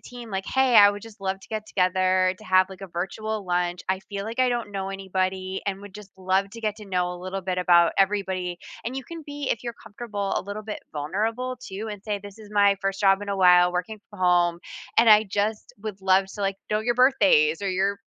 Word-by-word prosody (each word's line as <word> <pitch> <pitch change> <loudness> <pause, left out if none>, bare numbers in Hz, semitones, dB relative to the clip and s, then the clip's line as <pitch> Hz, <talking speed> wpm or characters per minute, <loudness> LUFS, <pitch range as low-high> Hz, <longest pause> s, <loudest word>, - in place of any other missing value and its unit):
team, 240 -2 -10
like, 195 -1 -3
"Hey, 265 -2 +2
I 205 0 +9
would 205 0 -6
just 220 0 -13
love 195 0 -2
to - - -16
get 215 -1 -4
together 185 0 +2
to 215 - -14
have, 185 0 +4
like, 190 0 -11
a - - -5
virtual 200 +5 -4
lunch. 175 0 -1
I 190 0 0
feel 200 -1 -4
like 225 +3 -6
I 255 -1 +4
don't 235 -4 -3
know 195 -1 -3
anybody 190 0 -2
and 195 -1 -2
would 200 -1 -12
just 210 -2 -11
love 190 +1 0
to 230 +2 -10
get 215 -2 -2
to 210 - -10
know 180 -2 -1
a - - -8
little 185 +2 -5
bit 185 -1 -3
about 170 -2 +5
everybody." 190 -3 0 0.3
And 240 - -4
you 270 - -4
can 330 +4 -9
be, 290 -1 -5
if 215 - -1
you're 235 -1 -4
comfortable, 205 -2 -4
a - - -1
little 205 +2 -6
bit 215 0 -6
vulnerable, 220 +12 -2
too 205 +3 -6
and 205 -2 -8
say, 210 -2 -2
"This 205 +1 -11
is 210 -2 -13
my 200 -1 +4
1st 195 0 -2
job 195 0 +4
in 205 - -7
a 200 - -1
while, 180 -1 +6
working 180 +4 -3
from 205 - -13
home, 175 -1 +3 0.4
and 230 - +6
I 215 0 +8
just 210 +2 -2
would 210 -3 -6
love 190 0 +4
to, 210 - -8
like, 195 0 0
know 210 - +1
your 240 +2 0
birthdays 245 - +4
or 195 - 0
your 195 +2 0
195 Hz, 240 wpm, -25 LUFS, 185-215 Hz, 0.4 s, I